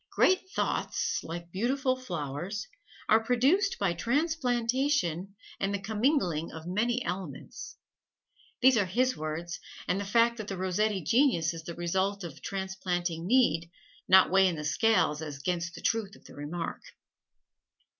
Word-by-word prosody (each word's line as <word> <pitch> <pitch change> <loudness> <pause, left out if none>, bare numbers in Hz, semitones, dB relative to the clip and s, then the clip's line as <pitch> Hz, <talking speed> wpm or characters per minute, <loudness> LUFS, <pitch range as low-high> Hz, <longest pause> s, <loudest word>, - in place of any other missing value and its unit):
"Great 375 0 +2
thoughts, - - -1
like 170 +1 -7
beautiful 255 - 0
flowers, 175 - -5 0.4
are 220 +1 +4
produced 275 - +2
by 195 -4 +1
transplantation 245 - 0 0.2
and 195 - 0
the 200 - 0
commingling 210 - 0
of 160 0 -9
many 235 +7 0
elements." 155 -4 -6 0.9
These 260 -2 +7
are 200 -4 +2
his 255 +7 +1
words, 160 +3 -4 0.3
and 185 - +1
the - - -2
fact 230 +3 +3
that 215 -3 -6
the 195 - -4
Rossetti 190 +1 0
genius 200 - +3
is 165 -1 -8
the 170 - -6
result 190 +3 -1
of 165 -5 -8
transplanting 180 -3 -3
need 170 -9 +3 0.4
not 190 -1 +6
weigh 190 0 +6
in 175 - 0
the 150 -1 -5
scale 220 +6 +3
as 150 -3 -6
'gainst 170 +3 -2
the - - -9
truth 220 -3 -1
of - - -20
the - - -13
remark. 155 +4 -5
195 Hz, 145 wpm, -29 LUFS, 170-235 Hz, 0.9 s, These